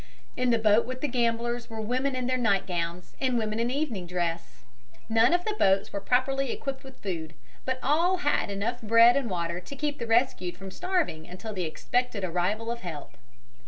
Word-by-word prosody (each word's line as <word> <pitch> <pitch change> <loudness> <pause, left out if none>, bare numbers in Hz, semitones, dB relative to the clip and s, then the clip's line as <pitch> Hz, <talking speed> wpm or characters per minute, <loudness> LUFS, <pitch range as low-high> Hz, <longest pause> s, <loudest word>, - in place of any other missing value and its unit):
In 250 0 +1
the 235 - +4
boat 220 +1 +4
with 255 0 -5
the 295 - +1
gamblers 235 -1 0
were 225 -1 -6
women 255 +5 0
in 255 -1 -2
their 255 +1 +1
night 200 -5 +2
gowns 175 0 -3
and 255 -2 +2
women 215 -1 -1
in 235 +1 +1
evening 250 - -2
dress. 170 -9 -3 0.5
None 225 +4 +5
of 355 +1 +2
the 430 - 0
boats 195 - +2
were 200 - -2
properly 260 +3 +1
equipped 275 -1 -4
with 265 -1 -14
food, 165 -5 -4 0.3
but 260 0 0
all 335 +7 +3
had 290 - +1
enough 200 +5 -2
bread 230 +2 +6
and 275 -4 0
water 170 -1 -2
to 185 +10 -9
keep 290 +1 -2
the 235 - -3
rescued 225 -7 +1
from 195 0 -8
starving 335 - -1
until 215 +5 -7
the 185 -3 -2
expected 225 +6 -1
arrival 185 +6 -1
of 235 - -4
help. 145 -9 -7
230 Hz, 195 wpm, -28 LUFS, 185-255 Hz, 0.5 s, bread